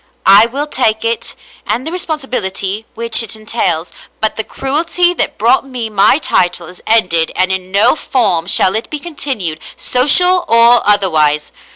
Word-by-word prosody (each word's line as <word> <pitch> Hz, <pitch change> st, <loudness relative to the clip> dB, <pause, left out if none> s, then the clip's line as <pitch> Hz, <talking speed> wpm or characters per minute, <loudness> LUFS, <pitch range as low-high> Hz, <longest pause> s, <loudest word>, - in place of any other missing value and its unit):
I 200 Hz, +4 st, +7 dB
will 275 Hz, +5 st, -3 dB
take 230 Hz, -7 st, -1 dB
it 230 Hz, 0 st, -3 dB, 0.3 s
and 255 Hz, -, -2 dB
the 320 Hz, -, -4 dB
responsibility 225 Hz, -, -4 dB
which 230 Hz, 0 st, +1 dB
it 225 Hz, -1 st, -4 dB
entails; 190 Hz, -6 st, -3 dB, 0.3 s
but 220 Hz, -, 0 dB
the 220 Hz, -, -3 dB
cruelty 330 Hz, +8 st, -1 dB
that -, -, -2 dB
brought 235 Hz, +5 st, +2 dB
me 240 Hz, -4 st, -6 dB
my 205 Hz, +5 st, +3 dB
title 175 Hz, -, -1 dB
is 180 Hz, +1 st, -14 dB
ended 180 Hz, -7 st, +1 dB
and 185 Hz, +1 st, 0 dB
in 185 Hz, -1 st, -4 dB
no 205 Hz, +8 st, +3 dB
form 195 Hz, -, -1 dB
shall 185 Hz, 0 st, +3 dB
it 220 Hz, -, -3 dB
be 305 Hz, -, -4 dB
continued, 270 Hz, -, -4 dB, 0.2 s
social 355 Hz, +8 st, +3 dB
or 235 Hz, +1 st, +5 dB
otherwise. 155 Hz, -7 st, +2 dB
225 Hz, 160 wpm, -13 LUFS, 190-265 Hz, 0.3 s, I